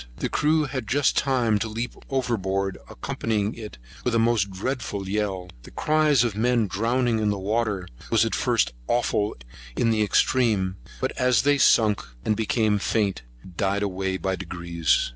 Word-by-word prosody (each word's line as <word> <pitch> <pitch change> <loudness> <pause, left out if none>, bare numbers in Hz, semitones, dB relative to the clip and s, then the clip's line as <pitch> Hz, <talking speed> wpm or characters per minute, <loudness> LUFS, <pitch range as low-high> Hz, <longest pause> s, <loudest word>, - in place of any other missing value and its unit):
The - - -2
crew 155 +1 +2
had 130 -5 -4
just 140 +4 +2
time 120 -6 +2
to 110 - -2
leap 115 +3 -4 0.2
over 130 -3 0
board, 95 -1 -2
accompanying 105 - -2
it 105 - -9 0.3
with 125 -2 0
a - - +4
most 115 -3 +2
dreadful 100 -1 -4
yell. 95 -3 -2
The - - -13
cries 150 -4 +3
of 120 -3 0
the 105 - -6
men 120 -1 +2
drowning 115 +4 0
in 105 -1 +1
the 100 - 0
water 105 -2 -1 0.2
was - - +4
at - - -2
first - - +1
awful 110 -3 0 0.4
in 115 - +2
the 110 -1 +1
extreme; 105 -3 +2 0.2
but 130 - 0
as 125 -3 +3
they 145 0 +3
sunk, 110 -5 +4 0.2
and 110 - +2
became 110 -1 +1
faint, 100 - 0 0.2
it 90 - -14
died 100 +1 0
away 95 -1 -2
by 95 0 -1
degrees. 85 -3 0
110 Hz, 175 wpm, -25 LUFS, 95-120 Hz, 0.4 s, a